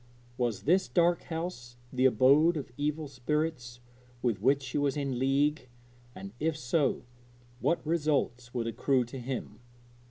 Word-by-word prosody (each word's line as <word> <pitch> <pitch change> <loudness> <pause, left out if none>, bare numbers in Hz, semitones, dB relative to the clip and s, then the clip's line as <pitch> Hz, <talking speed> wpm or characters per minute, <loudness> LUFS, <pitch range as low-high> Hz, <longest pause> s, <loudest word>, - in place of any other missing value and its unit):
Was 120 -5 -1
this 185 +6 +3
dark 175 -1 +2
house 160 -8 -5 0.2
the 130 0 +2
abode 140 +7 +5
of 135 -4 -6
evil 150 +2 -2
spirits 130 -2 -3 0.4
with 115 -6 0
which 135 +4 +3
she 130 +2 -2
was 145 -1 0
in 135 -4 -2
league? 140 +1 +1 0.5
and 100 +1 -8
if 160 0 0
so, 140 0 0 0.6
what 170 - 0
result 150 -6 0
would 120 -2 -2
accrue 125 +2 +1
to 125 +3 -8
him? 125 +1 -5
135 Hz, 145 wpm, -30 LUFS, 125-155 Hz, 0.6 s, abode